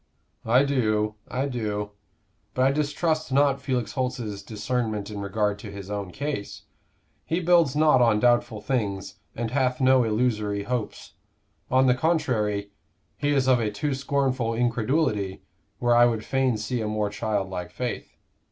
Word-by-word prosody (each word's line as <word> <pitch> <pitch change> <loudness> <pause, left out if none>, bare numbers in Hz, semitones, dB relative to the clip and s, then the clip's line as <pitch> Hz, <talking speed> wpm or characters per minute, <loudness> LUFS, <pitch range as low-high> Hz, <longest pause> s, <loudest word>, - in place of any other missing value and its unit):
"I 125 +4 +5
do, 110 -6 +1
I 130 +2 -2
do. 105 -6 -3 0.6
But 130 - +3
I 135 - +4
distrust 150 +2 -1
not 140 0 +3
Felix 130 -4 -1
Holt's 125 -6 -3
discernment 110 0 -3
in 100 -1 -5
regard 105 +1 -1
to 105 - -8
his 100 0 -8
own 100 -2 -3
case. 140 -2 -5 0.6
He 165 - -1
builds 170 -5 +3
not 150 -4 +5
on 115 -3 +4
doubtful 120 -2 +2
things 100 -6 -2 0.2
and 115 -1 -3
hath 130 -2 +1
no 130 -1 +5
illusory 105 -3 0
hopes; 115 -1 -4 0.6
on 130 +1 +4
the 125 - +5
contrary, 110 -9 0 0.4
he 145 - -1
is 135 -3 +2
of 130 -2 +5
a 110 -2 0
too 145 +8 -2
scornful 135 -4 0
incredulity 115 -3 0 0.3
where 120 -1 +2
I 120 0 +7
would 115 -2 -2
fain 135 -3 +1
see 110 +3 -2
a 110 - -2
more 105 -1 -1
childlike 100 -4 -2
faith. 125 -3 -5
120 Hz, 150 wpm, -25 LUFS, 105-135 Hz, 0.6 s, I